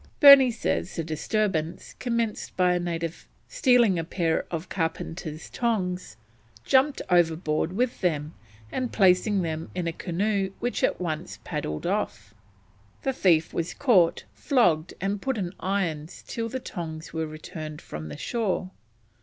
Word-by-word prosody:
Burney 280 -3 +10
says 225 -5 -2
the 165 - -2
disturbance 165 +1 -2
commenced 235 -3 -2
by 180 -1 +4
a 180 - +1
native 170 -1 -4 0.2
stealing 240 -8 +4
a - - -1
pair 165 -1 -1
of 165 +1 -4
carpenter's 160 -2 -4
tongs, 185 - -2 0.5
jumping 270 +2 +3
overboard 160 -2 +2
with 245 +4 -1
them, 155 -4 0 0.4
and 255 -2 -2
placing 195 0 +3
them 160 0 -3
in 180 -2 -2
a 165 - -1
canoe 195 +3 -1
which 245 - -2
at - - +2
once 170 -1 -4
paddled 145 - -4
off. - - -2 0.7
The 270 - 0
thief 170 -9 +3
was 170 0 -2
caught, 195 -12 +3
flogged, 175 - +2
and 195 +1 -2
put 265 -3 -1
in 180 -3 -3
irons 175 -5 -2
till 230 0 -3
the 260 - -3
tongs 160 -8 -7
were 160 -1 -2
returned 155 0 -7
from 75 +1 -7
the 75 - -7
shore. 195 -5 -2
180 Hz, 145 wpm, -26 LUFS, 160-215 Hz, 0.7 s, Burney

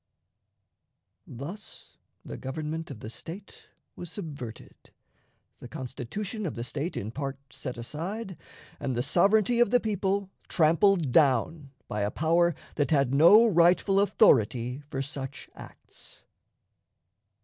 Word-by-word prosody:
Thus 155 - -9 0.3
the - - -7
government 155 +4 -5
of 125 -6 -9
the 110 - -7
State 180 - -10 0.3
was 175 - -8
subverted, 140 - -8 0.9
the - - -9
Constitution 135 - -5
of - - -5
the 115 - -4
State 145 +7 -4
in 105 +3 -4
part 135 +1 -4
set 125 -2 -6
aside, 180 - -5 0.4
and 130 - -2
the 120 - 0
sovereignty 205 - +3
of 240 - +5
the 245 +2 +4
people 200 -3 -1 0.2
trampled 170 -1 +3
down 140 +2 +2 0.2
by 105 - -3
a 100 - 0
power 165 +5 +2 0.2
that 145 - +1
had 140 -4 +2
no 170 +11 +7
rightful 185 0 +4
authority 130 - +3
for 135 -3 -3
such 135 -2 -6
acts. - - -14
155 Hz, 125 wpm, -28 LUFS, 130-195 Hz, 0.9 s, no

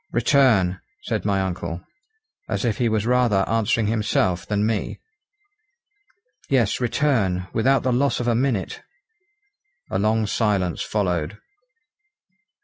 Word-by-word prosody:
"Return!" 115 -7 +3 0.2
said - - -3
my 100 -2 +1
uncle, 85 -2 -4 0.7
as - - -1
if 115 -3 -1
he 120 -2 +2
was 110 -1 0
rather 120 -6 +2
answering 115 0 +1
himself 105 -4 0
than 105 0 0
me. 110 -1 -2 1.5
"Yes, 125 -4 +1
return, 115 -8 0
without 135 +4 +2
the 130 - +1
loss 140 +3 +1
of 120 - -2
a 120 - +3
minute." 115 -5 -1 1.1
A 95 - 0
long 110 +2 +1
silence 100 -5 0
followed. 90 -3 -2
110 Hz, 120 wpm, -22 LUFS, 95-120 Hz, 1.5 s, Return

